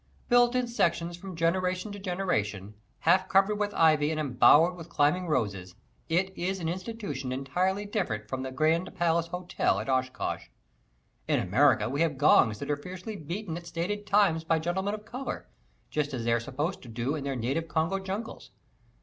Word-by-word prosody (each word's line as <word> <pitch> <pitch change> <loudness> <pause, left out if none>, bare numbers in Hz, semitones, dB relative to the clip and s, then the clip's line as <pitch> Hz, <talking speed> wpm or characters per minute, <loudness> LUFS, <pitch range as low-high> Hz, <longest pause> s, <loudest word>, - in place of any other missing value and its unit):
Built 245 0 +5
in 250 -1 +1
sections 175 -7 0
from 185 +1 -9
generation 180 +4 0
to 205 - -7
generation, 110 - -2 0.3
half 185 +3 +3
covered 195 +2 +3
with 205 0 0
ivy 155 -2 +4
and 155 -1 -2
embowered 155 +5 +5
in 165 - -7
climbing 170 +3 +1
roses, 100 - -2 0.3
it 190 +3 +1
is 190 +2 -2
an 165 - -3
institution 185 - -4
entirely 180 +10 -1
different 145 - -2
from 130 +3 -4
the 130 0 -4
"Grand 160 +6 +1
Palace 170 0 +1
Hotel" 180 +1 -1
at - - -5
Oshkosh. 130 0 -1 0.8
In - - +2
America - - +3
we 140 +5 -1
have 160 -4 +1
gongs 125 -6 +5
that 140 +5 -4
are 145 - 0
fiercely 185 +7 -7
beaten 170 +1 -5
at 170 0 -9
stated 195 +5 -3
times 195 -6 +3
by 165 0 +2
gentlemen 190 +5 -1
of 210 0 -11
color, 255 +3 -5 0.4
just 145 -2 -1
as 115 -2 -4
they 115 - +3
are 120 - +2
supposed 145 +9 -3
to 125 - -12
do 120 +5 -2
in 150 -3 -3
their 140 -1 -2
native 135 +8 -2
Congo 165 +4 0
jungles. 195 +4 -6
165 Hz, 180 wpm, -28 LUFS, 140-190 Hz, 0.8 s, Built